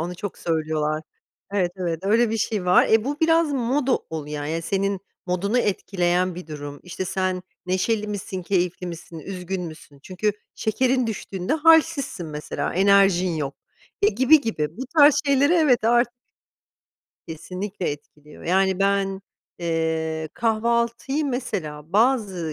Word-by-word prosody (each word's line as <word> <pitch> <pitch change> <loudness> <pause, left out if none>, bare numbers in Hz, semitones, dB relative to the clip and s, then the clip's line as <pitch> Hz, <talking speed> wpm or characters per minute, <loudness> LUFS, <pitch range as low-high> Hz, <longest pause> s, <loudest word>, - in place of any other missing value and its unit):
onu 175 +2 -3
çok 200 +2 -6
söylüyorlar. 155 -1 -1 0.5
Evet, 180 -3 +1
evet 170 -3 -2
öyle 220 +3 +3
bir 225 - 0
şey 210 -3 -1
var. 180 0 +5
E, 220 0 +4
bu 290 +3 -3
biraz 325 -2 +3
moda 260 +1 +1
ol 160 -2 -5
ya, 150 -1 -4
yani 165 +2 -2
senin 195 +1 -1 0.3
modunu 195 +6 0
etkileyen 185 -4 0
bir 180 -2 -8
durum, 145 -2 -7
işte, 180 +1 -5
sen 185 0 -1 0.2
neşeli 210 +4 0
misin, 195 -2 -5
keyifli 180 -1 -1
misin, 170 -1 -8
üzgün 185 +2 -5
müsün? 155 -4 -10
Çünkü 205 +3 -1 0.2
şekerin 255 +3 +1
düştüğünde 195 0 -3
hâlsizsin 320 - +3
mesela 150 -1 -4
enerjin 190 -2 +4
yok, 140 -2 -3 0.5
e, 205 - +6
gibi 260 +8 +5
gibi 160 - -3
bu 260 - -5
tarz 290 -1 +8
şeyleri 280 +3 +4
evet 275 -10 +3
artık 240 +1 +3 1.2
Kesinlikle 180 +3 -4
etkiliyor, 150 +1 -11
yani 190 +1 +2
ben, 195 -1 +1 0.4
eee, 160 -2 -1
kahvaltıyı, 235 +5 0
mesela 180 - -4
bazı 205 -8 +1
190 Hz, 140 wpm, -23 LUFS, 165-230 Hz, 1.2 s, tarz